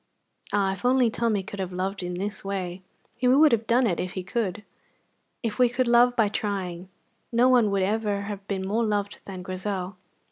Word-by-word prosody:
Ah, 200 Hz, -1 st, +2 dB
if 195 Hz, -, -10 dB
only 250 Hz, -2 st, +3 dB
Tommy 225 Hz, -4 st, 0 dB
could 200 Hz, +1 st, -8 dB
have 185 Hz, -1 st, -3 dB
loved 190 Hz, +2 st, -3 dB
in 180 Hz, 0 st, -4 dB
this 200 Hz, +2 st, -4 dB
way! 190 Hz, -2 st, -4 dB, 0.3 s
He 250 Hz, +1 st, -1 dB
would 285 Hz, +4 st, +6 dB
have 225 Hz, -1 st, +1 dB
done 245 Hz, +2 st, +4 dB
it 185 Hz, -7 st, 0 dB
if 180 Hz, 0 st, -3 dB
he 185 Hz, -, -4 dB
could. 210 Hz, +1 st, -2 dB, 0.8 s
If 225 Hz, -1 st, -3 dB
we 250 Hz, -1 st, +5 dB
could 250 Hz, +1 st, 0 dB
love 240 Hz, +1 st, +5 dB
by 225 Hz, -3 st, +3 dB
trying, 190 Hz, -4 st, -3 dB, 0.4 s
no 240 Hz, +2 st, +4 dB
one 245 Hz, -4 st, +5 dB
would 200 Hz, -1 st, +1 dB
ever 205 Hz, 0 st, 0 dB
have 200 Hz, -1 st, -6 dB
been 190 Hz, -2 st, -2 dB
more 220 Hz, +4 st, +1 dB
loved 205 Hz, -2 st, -1 dB
than 185 Hz, -2 st, -7 dB
Grizel. 185 Hz, 0 st, -4 dB
205 Hz, 200 wpm, -26 LUFS, 190-235 Hz, 0.8 s, would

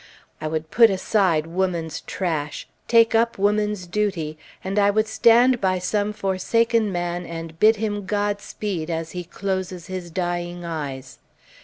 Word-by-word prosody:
I 155 Hz, -, -2 dB
would 155 Hz, 0 st, -3 dB
put 230 Hz, -1 st, +7 dB
aside 190 Hz, -5 st, +1 dB
woman's 170 Hz, -2 st, -2 dB
trash, 155 Hz, -6 st, -3 dB, 0.2 s
take 230 Hz, -1 st, +5 dB
up 230 Hz, +1 st, +2 dB
woman's 210 Hz, -1 st, +1 dB
duty, 175 Hz, -5 st, -2 dB, 0.3 s
and 195 Hz, +2 st, -1 dB
I 200 Hz, 0 st, +4 dB
would 215 Hz, +2 st, +2 dB
stand 240 Hz, +2 st, +4 dB
by 185 Hz, -1 st, +2 dB
some 205 Hz, +3 st, -1 dB
forsaken 215 Hz, +3 st, +1 dB
man 175 Hz, 0 st, -2 dB
and 165 Hz, -1 st, -7 dB
bid 220 Hz, +1 st, +6 dB
him 205 Hz, -2 st, -3 dB
Godspeed 205 Hz, -4 st, -2 dB
as 165 Hz, -1 st, -3 dB
he 180 Hz, 0 st, -5 dB
closes 185 Hz, -1 st, -4 dB
his 185 Hz, -1 st, -6 dB
dying 175 Hz, 0 st, -3 dB
eyes. 145 Hz, -6 st, -6 dB
190 Hz, 145 wpm, -23 LUFS, 170-210 Hz, 0.3 s, put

